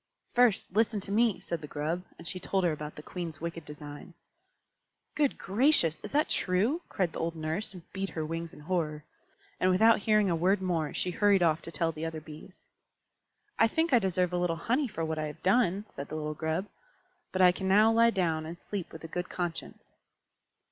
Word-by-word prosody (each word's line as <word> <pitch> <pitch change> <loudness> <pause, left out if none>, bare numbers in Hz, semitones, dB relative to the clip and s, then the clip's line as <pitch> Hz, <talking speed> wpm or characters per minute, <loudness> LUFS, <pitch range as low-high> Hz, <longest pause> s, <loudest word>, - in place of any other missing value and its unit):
"First 245 -4 +3
listen 220 0 +2
to 195 - -4
me," 225 -1 +3
said 170 -2 -4
the 150 - -7
Grub, 155 +5 -2 0.2
and 170 - -10
she 185 +2 -3
told 190 +1 0
her 175 - +3
about 150 0 -6
the 150 - -10
Queen's 165 -4 -6
wicked 165 -1 -5
design. 150 +3 -10 1.0
"Good 290 -3 +1
gracious! 200 - +3
is - - -8
that 300 +2 +2
true?" 210 - +1
cried 180 -4 -1
the - - -5
old 165 0 -2
Nurse, 160 +7 -2
and 175 - -10
beat 195 0 -2
her 160 -1 -3
wings 165 +1 -4
in - - -13
horror. 155 -3 -2 0.5
And 185 - +3
without 220 +5 +5
hearing 215 0 +3
a 175 - +2
word 185 +5 +2
more, 170 -5 -1
she 180 - -2
hurried 200 0 +3
off 160 -1 +2
to 165 - -8
tell 165 +1 0
the 155 0 -5
other 160 -1 -5
Bees. 155 +4 -13 0.9
"I 225 - +6
think 320 +6 0
I 245 - +7
deserve 180 -3 0
a - - +1
little 175 -2 +1
honey 250 - 0
for 165 -7 -3
what 160 0 -2
I 155 - -1
have 150 - -10
done," 195 -1 +2
said 140 - -7
the 155 - -5
little 150 -1 -3
Grub. 160 +4 -2 0.7
"But 185 0 +2
I 180 - +8
can 190 +1 -4
now 210 +4 +6
lie 230 +1 +5
down 165 -7 0
and 170 +1 -8
sleep 200 -4 -5
with 160 - -10
a - - -5
good 175 +2 -4
conscience." 175 -2 -5
180 Hz, 210 wpm, -30 LUFS, 160-200 Hz, 1.0 s, I